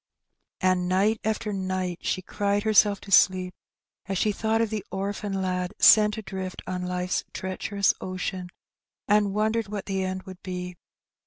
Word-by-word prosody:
And 185 -1 +2
night 205 +4 +2
after 215 -1 -1
night 185 -2 -2
she 185 - -2
cried 205 +2 -1
herself 210 -2 +4
to 200 - -11
sleep, 185 -1 +4 0.5
as 195 -1 -2
she 210 - +2
thought 220 +2 0
of 225 -1 0
the 215 -3 -3
orphan 195 0 -3
lad 180 -1 -2
sent 210 0 +6
adrift 190 -3 -6
on 185 -1 -3
life's 180 0 -1
treacherous 195 +1 0
ocean, 185 0 -4 0.6
and 205 -1 +3
wondered 220 +1 +1
what 205 -1 -5
the 195 -1 -1
end 185 0 -3
would 185 -1 -11
be. 180 -1 -5
195 Hz, 155 wpm, -26 LUFS, 185-210 Hz, 0.6 s, sent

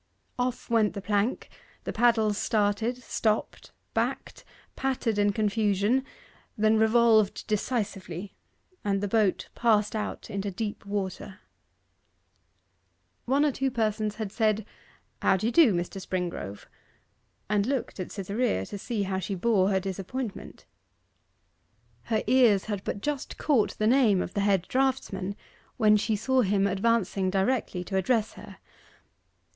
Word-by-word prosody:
Off 250 0 -2
went 225 -3 +2
the - - -3
plank; 205 +4 0 0.4
the - - -4
paddles 220 -3 +3
started, 215 +3 0
stopped, 220 -3 -2 0.2
backed, - - -2 0.3
pattered 255 -5 -1
in 205 0 +3
confusion, 210 +3 +1 0.5
then 215 +1 +3
revolved 220 -1 +3
decisively, 200 -4 -3 0.5
and 200 -1 0
the 205 - -2
boat 210 -2 +1
passed 220 -2 +2
out 215 - -4
into 200 -1 -3
deep 205 +1 -5
water. 200 0 -4 1.9
One 275 +4 +3
or 295 - +2
two 270 +1 -1
persons 215 -3 -1
had 215 -3 -4
said, 215 -1 +1 0.6
'How 190 - +3
d'ye 220 +5 -1
do, 310 -4 +6
Mr. 175 +2 -3
Springrove?' 180 - -4 0.8
and 205 +1 +1
looked 265 -6 -2
at 185 - -5
Cytherea, 200 - -1
to 205 - -7
see 220 -1 -2
how 190 -1 -2
she 195 +2 -3
bore 195 0 +2
her 190 -1 +2
disappointment. 195 +5 -6 1.4
Her 220 -2 0
ears 235 -5 +4
had 205 -3 -4
but 200 - -4
just 290 0 -3
caught 265 -9 +1
the 215 - 0
name 230 -5 +4
of - - -8
the 200 - 0
head 195 -3 +2
draughtsman, 245 -8 -1 0.4
when 215 -2 +5
she 215 +1 +1
saw 260 +5 +2
him 200 -2 +2
advancing 200 -1 +1
directly 195 -1 0
to 190 +2 -3
address 220 +3 +1
her. - - -12
210 Hz, 135 wpm, -27 LUFS, 195-235 Hz, 1.9 s, do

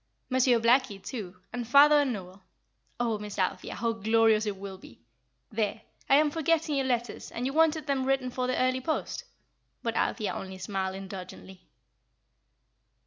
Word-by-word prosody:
Monsieur 255 -2 +4
Blackie, 240 -1 +3
too, 195 -3 -7 0.2
and 245 -2 -4
father 290 +3 +7
and 275 -3 0
Noel. 190 -3 -7 0.6
Oh, 230 -3 0
Miss 210 -1 -7
Althea, 185 -2 -1
how 230 +1 0
glorious 220 0 +3
it 200 -2 -2
will 190 -1 -8
be! 115 - -15 0.5
There; 210 -2 -2 0.3
I 275 - +7
am 300 +1 +4
forgetting 320 0 +1
your 270 -2 0
letters, 240 -3 -2
and 240 - -4
you 270 - -1
wanted 320 0 +3
them 275 -3 0
written 265 -2 +1
for 250 0 -2
the 255 - 0
early 255 0 +1
post;" 310 +4 -3 0.6
but 230 -1 -2
Althea 215 -3 0
only 190 0 -6
smiled 190 0 -3
indulgently. 190 -1 -9
235 Hz, 160 wpm, -28 LUFS, 200-270 Hz, 0.6 s, father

